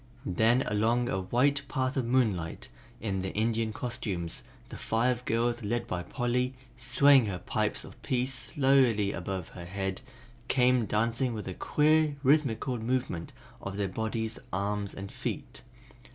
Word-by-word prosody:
Then 115 +7 +3
along 115 +4 +1
a 95 - 0
white 130 +9 +2
path 130 -1 -1
of 130 -4 0
moonlight, 105 -10 0 0.3
in 100 -3 -2
their 95 - -3
Indian 110 +1 +1
costumes, 105 -8 -4 0.3
the - - -8
five 120 +2 0
girls 120 +1 0
led 120 +3 -1
by 90 - -3
Polly, 125 +6 -1 0.2
swaying 135 +1 +5
her 95 -3 -2
pipes - - -1
of - - -14
peace 130 0 0
slowly 130 -6 +3
above 95 -4 -4
her 85 -2 -9
head, 95 +2 -3 0.5
came 125 -3 +3
dancing 115 +3 0
with 105 - -5
a 95 - -3
queer, 155 - +3
rhythmical 130 -3 +2
movement 120 -7 -2 0.3
of 100 0 -5
their 100 -1 0
bodies, 110 +2 -3
arms 100 +1 -2
and 100 0 -7
feet. - - -5
115 Hz, 145 wpm, -29 LUFS, 100-125 Hz, 0.5 s, swaying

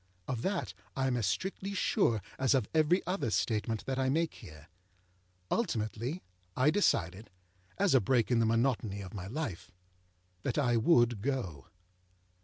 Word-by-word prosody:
Of 125 -3 -2
that 190 +4 -2 0.2
I 135 - 0
am 130 -2 +1
as 115 -6 0
strictly 190 - -2
sure 120 - +2 0.2
as 130 +1 +3
of 125 -6 +1
every 160 +4 +3
other 180 - -1
statement 110 0 -1
that 135 0 -2
I 130 0 +1
make 160 +3 +1
here. 75 - -13 0.8
Ultimately 120 - -1 0.3
I 130 +4 +4
decided, 105 - +1 0.5
as 200 -4 +3
a 130 - +6
break 120 +3 +2
in 120 - +4
the 115 - +3
monotony 115 -3 0
of 95 +2 -9
my 95 -3 -6
life, 115 - -4 0.7
that - - -2
I 125 -5 +2
would 120 - +4
go. 105 - -3
120 Hz, 155 wpm, -32 LUFS, 105-150 Hz, 0.8 s, a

